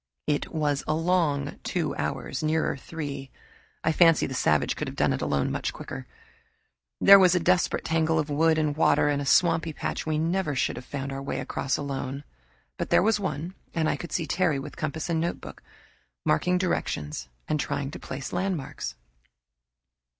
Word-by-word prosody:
It 145 -1 -1
was 150 -3 0
a 155 - +2
long 160 -4 +1
two 170 -4 -1
hours, 140 - -3
nearer 155 0 +1
three. 140 -2 -6 0.5
I 160 - +3
fancy 165 0 +5
the 130 - -5
savage 75 - +2
could - - -4
have - - -6
done - - +2
it - - -3
alone 70 -1 0
much - - -2
quicker. - - -7 0.9
There 200 0 +9
was 185 -1 +5
a - - +4
desperate 180 +1 +1
tangle 160 0 +2
of 155 -2 0
wood 160 +2 +3
and 150 -2 +1
water 150 -1 +3
and 145 -1 0
a 140 - -4
swampy 165 -1 +3
patch - - -4
we 155 -1 +1
never 165 -1 0
should - - 0
have - - -8
found 140 -1 -4
our 135 0 -4
way 135 -1 -3
across 135 0 -1
alone. 140 -1 -4 0.5
But - - -3
there - - +5
was 220 0 +3
one, 180 -3 -3 0.2
and 160 -2 +1
I - - +1
could 170 +3 -8
see 165 - -1
Terry, 170 -1 +1
with 135 - -7
compass 155 0 -3
and 165 -2 0
notebook, 170 - -4 0.6
marking 180 - +2
directions 75 - -2 0.2
and 150 - 0
trying 140 0 -2
to - - -8
place 135 +1 -6
landmarks. 180 -5 -3
155 Hz, 180 wpm, -27 LUFS, 140-170 Hz, 0.9 s, There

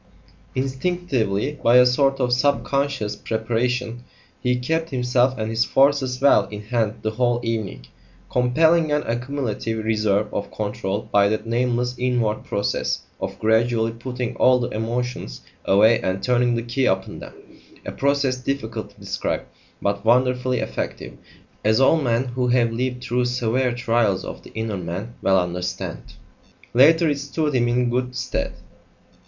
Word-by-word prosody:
Instinctively, 135 - -1
by 120 - +5
a 125 - +8
sort 135 +2 +2
of 125 -1 +1
sub 140 +3 +2
conscious 140 -7 -1
preparation, 120 +2 -2 0.4
he 125 0 +1
kept 160 +6 -1
himself 125 0 +1
and 110 0 -3
his 115 +1 +2
forces 135 -1 +2
well 140 +1 +5
in 105 0 -8
hand 110 -1 -1
the 110 - 0
whole 120 +1 +1
evening, 110 - -3 0.4
compelling 160 +6 +3
an 150 0 +1
accumulative 115 -3 -3
reserve 105 -2 +1
of - - -3
control 100 -2 -3
by 100 0 +4
that 110 +1 -2
nameless 120 +1 0
inward 120 -4 0
process 100 - -1 0.2
of 95 0 -4
gradually 110 +2 +2
putting 125 +1 -5
all 130 0 +5
the 120 - -2
emotions 115 - -3 0.2
away 110 +4 +5
and 95 +1 -2
turning 125 -1 +2
the 115 - -2
key 125 +2 0
upon 95 0 -1
them - - -11 0.5
a - - -4
process 140 -2 +1
difficult 120 -4 -4
to - - -23
describe, - - -3 0.4
but 100 0 -1
wonderfully 125 +2 +2
effective, - - -5 0.5
as 110 +1 +3
all 155 +4 +4
men 120 -2 +1
who 125 +1 -1
have 120 -2 +3
lived 125 +1 -3
through 125 0 0
severe 125 +1 0
trials 115 -5 0
of - - -7
the - - -14
inner 110 -2 -3
man 90 +6 -5
well 95 0 +3
understand. 90 0 -4 0.6
Later, 160 +7 +6
it 145 -2 0
stood 150 +1 -2
him 120 -2 +2
in 120 0 +1
good 125 +1 -1
stead. - - -2
120 Hz, 150 wpm, -22 LUFS, 110-130 Hz, 0.6 s, a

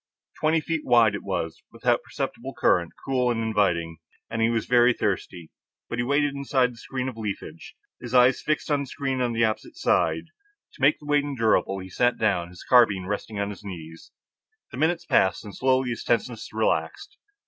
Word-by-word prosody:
Twenty 155 +1 +2
feet 160 0 -2
wide 115 -3 +4
it 100 - -4
was, 85 -4 -4
without - - +1
perceptible - - -5
current, - - +2
cool 130 -2 +1
and 120 -2 0
inviting, 90 -7 0 0.3
and 115 0 -2
he 115 - +3
was 115 -2 -1
very 120 0 +5
thirsty. 90 -6 -3 0.4
But 115 - -3
he - - +2
waited 140 +2 +1
inside 135 -2 +1
his 115 -1 -14
screen 130 -1 -4
of 125 -3 -6
leafage, 100 -7 -6 0.3
his 120 - -7
eyes 125 +1 +5
fixed 155 0 -1
on 145 - +3
the 140 - -3
screen 135 -2 -3
on 120 -1 +1
the 115 0 +3
opposite 110 -1 -4
side. 80 0 +1 0.5
To - - -16
make 140 +3 +5
the 150 - -16
wait 145 0 +2
endurable, 115 -8 +1
he 95 0 -8
sat 120 +6 +2
down, 90 -6 0
his 90 0 -12
carbine 105 -7 +4
resting 105 +2 -4
on 100 0 -1
his 105 - -11
knees. 80 -4 -9 0.6
The - - -8
minutes 160 +4 +1
passed, 95 +1 +2
and 105 - -9
slowly 130 -1 +1
his 115 - -5
tenseness 120 -1 -1
relaxed. 405 0 -1
115 Hz, 190 wpm, -25 LUFS, 100-135 Hz, 0.6 s, very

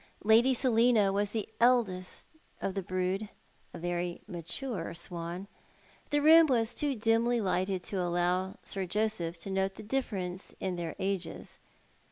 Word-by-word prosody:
Lady 230 +5 +5
Selina 230 -5 +3
was 205 +1 +1
the 220 -1 -3
eldest 225 -7 +2 0.3
of 195 - -2
the 195 - -2
brood, 185 +3 -2 0.4
a - - -8
very 175 0 -2
mature 180 - -5
swan. 170 +2 -5 0.6
The 290 -1 +1
room 320 +1 +8
was 235 -4 +1
too 290 -2 -1
dimly 230 +2 +2
lighted 185 -2 0
to 195 -3 -2
allow 180 +2 0
Sir 195 -2 -3
Joseph 190 -4 -1
to 195 - -5
note 190 0 0
the - - -9
dilference 200 -7 -3
in 190 -2 -2
their 170 -2 -4
ages. 190 -2 -4
195 Hz, 145 wpm, -31 LUFS, 180-230 Hz, 0.6 s, room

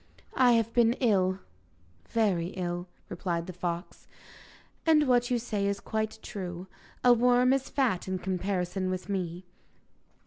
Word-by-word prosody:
'I 250 -2 +5
have 230 -1 +1
been 235 -1 +4
ill 190 -7 +2 0.7
very 195 -7 +1
ill,' 175 0 -3 0.2
replied 170 -1 -3
the 185 - -7
fox, 175 0 -5 0.8
'and 305 -3 +4
what 245 -1 +3
you 250 - +2
say 210 -4 -2
is 200 0 -1
quite 220 +1 -3
true. 180 -2 -6 0.4
A 245 - +7
worm 245 +2 +4
is 270 -1 -1
fat 240 -11 0
in 190 0 -1
comparison 185 0 -2
with 185 0 -4
me. 180 -2 -3
200 Hz, 140 wpm, -29 LUFS, 180-240 Hz, 0.8 s, A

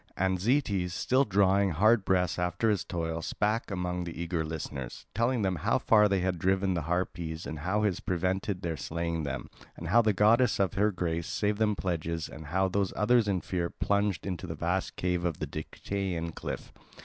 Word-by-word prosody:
And 95 0 +1
Zetes, 100 -6 +1
still 130 +9 +2
drawing 100 -1 +3
hard 105 +6 +4
breath 90 -1 +1
after 90 +5 +1
his 100 -5 0
toil, 80 -1 -3
spake 105 +6 -1
among 90 -2 -2
the 85 -1 -7
eager 85 -1 -1
listeners, 75 -5 -6
telling 115 +2 +1
them 95 -2 0
how - - +1
far 105 -2 +4
they 100 -2 +1
had 90 -1 -1
driven 95 +1 +2
the 85 - -1
Harpies 85 -2 -2
and 80 - -5
how 95 +7 0
his 100 -4 +1
prevented 95 +2 -1
their 80 -2 -2
slaying 80 +2 -2
them, 70 -1 -4 0.3
and 85 - -6
how 120 +6 +6
the 110 -2 +3
goddess 110 +6 +4
of 95 -2 +2
her 105 +2 +3
grace 85 -3 -2
gave 105 0 +1
them 105 -1 +2
pledges, 85 -3 -2
and 80 -1 -9
how 95 +4 +1
those 95 0 0
others 115 +1 +3
in 95 -3 +1
fear 85 -2 -2
plunged 100 -1 0
into 95 -1 -4
the 80 - -4
vast 90 +4 -1
cave 90 -1 -1
of 85 -4 -1
the - - -3
Dictaean 90 -5 -4
cliff. - - -6
90 Hz, 195 wpm, -29 LUFS, 85-100 Hz, 0.3 s, how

